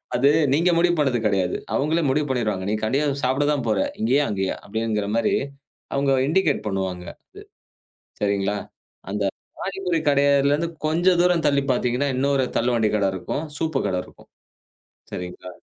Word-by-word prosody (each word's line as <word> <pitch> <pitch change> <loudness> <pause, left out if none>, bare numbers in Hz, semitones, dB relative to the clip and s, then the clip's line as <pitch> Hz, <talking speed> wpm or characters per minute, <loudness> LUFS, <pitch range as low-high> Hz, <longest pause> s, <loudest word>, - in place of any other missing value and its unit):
அது 135 +3 +4 0.2
நீங்க 170 +5 +3
முடிவு 175 +1 +3
பண்ணது 135 -5 +2
கெடையாது. 95 -3 0 0.2
அவங்களே 160 +4 +1
முடிவு 145 +2 +1
பண்ணிருவாங்க. 110 -7 -1
நீ - - 0
கண்டிப்பா 135 +7 +1 0.2
சாப்ட 130 +3 +1
தான் 145 -4 -1
போற. 105 -3 +1 0.2
இங்கயா? 130 +6 +3
அங்கயா? 95 -2 -1
அப்டிங்கிற 110 -1 -2
மாரி 115 -1 +2 0.6
அவங்க 140 0 +1 0.2
இண்டிகேட் 160 -1 +2
பண்ணுவாங்க. 95 -3 -3 0.9
அது - - -40
சரிங்களா? 100 0 0 0.5
அந்த 100 +1 -2 0.4
பாணிபுரி 190 -3 -2
கடைலருந்து 140 +2 +3 0.2
கொஞ்சம் 175 +3 +3
தூரம் 175 -2 +3
தள்ளி 140 -1 +3
பார்த்தீங்கன்னா, 125 +2 0
இன்னொரு 135 +1 +1
தள்ளுவண்டி 115 -2 +2
கட 100 -2 +1
இருக்கும். 95 - -4
சூப்பு 160 -4 -1
கட 95 - -1
இருக்கும். - - -19 0.8
சரிங்களா? 90 0 -7
130 Hz, 140 wpm, -23 LUFS, 105-150 Hz, 0.9 s, அது